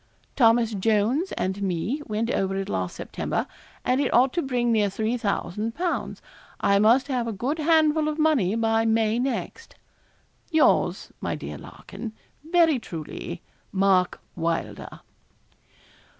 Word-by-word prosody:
Thomas 230 -2 +4
Jones 220 - +1
and 190 +2 -2
me 195 - -1
went 225 +2 -1
over 195 0 0
it 195 0 -2
last 95 -1 -2
September, - - -3 0.4
and 255 +2 +2
it 275 - 0
ought 255 +2 +4
to 345 - 0
bring 245 -4 0
near 210 -3 +3
3,000_l_. 220 - -2 0.4
I 200 0 +3
must 235 +6 +4
have 250 -4 -1
a - - -1
good 255 +10 -2
handful 310 -1 +3
of 305 0 -2
money 290 - +2
by 225 0 +2
May 225 0 +2
next. 270 - -4 0.7
'Yours, 320 -3 +2
my - - -2
dear - - -7
Larkin, 225 -2 -9 0.3
'Very 325 -3 +3
truly, 170 -1 -7 0.3
'MARK 190 -2 +2 0.2
WYLDER.' 165 -1 -3
230 Hz, 130 wpm, -25 LUFS, 200-275 Hz, 0.7 s, Thomas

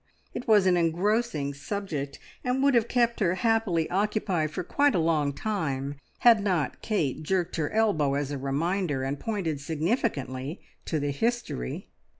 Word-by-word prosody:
It - - -6
was 210 -4 +5
an 180 -1 +4
engrossing 175 -2 +1
subject, 145 -2 -4 0.3
and 250 +2 0
would 280 0 +4
have 235 -2 +3
kept 235 -1 +1
her 185 -4 +2
happily 200 -6 +1
occupied 195 -4 0
for 180 +4 -4
quite 285 +10 +2
a - - +3
long 155 -3 +2
time, 140 -7 -2 0.3
had 230 -4 +6
not 175 -9 0
Kate 160 - -1
jerked 180 +2 -1
her 150 -2 0
elbow 165 -11 +2
as 145 0 -2
a 145 - -2
reminder, 145 +2 -1
and 135 +1 -2
pointed 175 -10 -2
significantly 155 - -2 0.3
to 160 - -1
the 145 0 -1
history. 225 - -2
175 Hz, 155 wpm, -27 LUFS, 145-215 Hz, 0.3 s, had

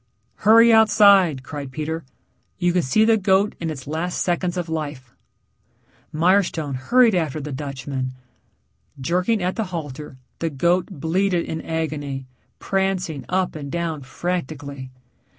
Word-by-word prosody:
"Hurry 230 +2 +6
outside," 200 -9 +5
cried 140 -1 -7
Peter. 155 +3 -4 0.5
"You 175 -2 +1
can 180 - +3
see 215 +10 +3
the 225 0 +4
goat 195 +1 +2
in 165 - -3
its 135 -5 -6
last 160 +4 -3
seconds 175 0 -1
of 175 -1 -2
life." 145 -6 -5 1.0
Mirestone 165 -3 +1
hurried 230 - +3
after 160 -4 -1
the 150 0 -6
Dutchman. 130 -1 -4 0.9
Jerking 180 - 0
at 180 +3 -1
the 220 - 0
halter 150 -6 -7 0.2
the 165 - -1
goat 170 +5 +1
bleated 180 +2 0
in 160 - -4
agony, 145 -4 -3 0.3
prancing 190 -6 -1
up 185 0 0
and 140 -2 -6
down 165 -3 -2
frantically. 140 -3 -5
165 Hz, 135 wpm, -22 LUFS, 145-185 Hz, 1.0 s, Hurry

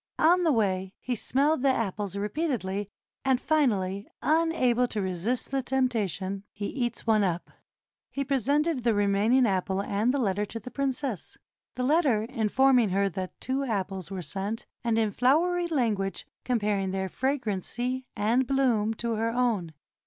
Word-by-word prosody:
On 350 +3 +5
the 330 -3 +3
way 190 -5 0
he 255 - -3
smelled 275 +5 +1
the 275 - +2
apples 205 -5 -1
repeatedly, 205 - -2 0.3
and 265 -2 +2
finally, 205 -12 +1 0.2
unable 300 -7 +2
to 220 - -3
resist 190 +8 -2
the 270 0 +1
temptation, 210 -7 -1
he 205 - -5
eats 240 +1 -3
one 215 -2 +3
up. 175 -2 -2 0.6
He 275 - -2
presented 280 +3 +1
the 230 -2 +2
remaining 205 +5 +3
apple 190 -2 0
and 205 +4 +1
the 280 - 0
letter 205 -5 0
to 230 +2 -5
the 250 +4 -9
princess, 270 - -3 0.4
the 250 - -2
let 305 +6 +4
ter 220 -6 +2
informing 240 +1 +3
her 195 +1 +1
that 185 0 -6
two 265 +2 -1
apples 195 - -3
were 190 -2 -5
sent, 195 +9 -4 0.2
and 230 -1 +1
in 220 -2 +2
flow 265 - +3
ery 355 -1 0
language 220 - -1 0.2
comparing 210 -5 0
their 190 0 -2
fragrancy 250 +1 -2
and 235 +5 +2
bloom 240 -6 +2
to 235 +1 -2
her 225 +1 0
own. 230 -8 0
230 Hz, 160 wpm, -27 LUFS, 200-265 Hz, 0.6 s, On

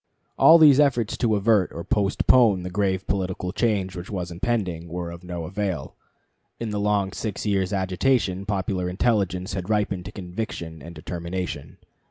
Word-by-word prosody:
All 165 - +8
these 150 -4 +7
efforts 130 -7 +2
to 115 -4 +2
avert 105 -2 +2
or 85 - -6
postpone 105 0 +3
the 90 - -5
grave 95 -1 0
political 95 -1 -2
change 100 -4 0
which 90 +1 -7
was 90 -4 -4
impending 90 -4 -2
were 85 0 -5
of 85 +1 -10
no 90 -1 -5
avail. 95 -5 -3 0.6
In 115 -2 -3
the 105 - -2
long 100 -2 +1
six 105 +1 -4
years' 95 -3 0
agitation 95 0 0
popular 95 -3 -1
intelligence 95 -2 0
had 95 0 -4
ripened 100 -4 0
to 100 - -7
conviction 90 -5 -6
and 85 +4 -10
determination. 85 -1 -5
95 Hz, 160 wpm, -24 LUFS, 90-105 Hz, 0.6 s, All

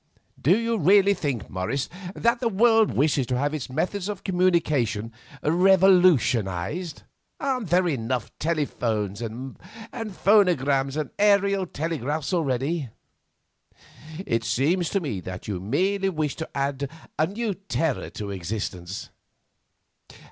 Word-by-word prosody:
"Do 175 - +4
you 230 -1 -1
really 200 +4 +5
think, 140 - -3
Morris, 95 +9 -2 0.3
that 235 +1 +1
the 235 - 0
world 225 +1 +4
wishes 140 -3 +2
to 125 - 0
have 145 +3 0
its 150 -5 -4
methods 185 +8 -2
of 205 -3 -5
communication 155 - +1 0.3
revolutionised? 170 - +3 0.4
Aren't 255 -8 -2
there 180 +1 +3
enough 125 -5 -2
telephones 115 - -1
and 120 +4 -6 0.4
phonograms 180 - +2
and 155 - -3
aerial 200 -2 +3
telegraphs 155 0 -3
already? 140 -2 -1 1.4
It 115 0 0
seems 160 +10 +1
to 200 - +1
me 140 - -3
that 90 +1 -8
you 100 -4 -3
merely 190 - 0
wish 155 -5 -2
to 160 - -5
add 140 0 -1 0.3
a 155 - +3
new 210 +3 -2
terror 165 -7 -2
to 100 -1 -6
existence. 95 -1 -5
155 Hz, 120 wpm, -25 LUFS, 125-190 Hz, 1.4 s, really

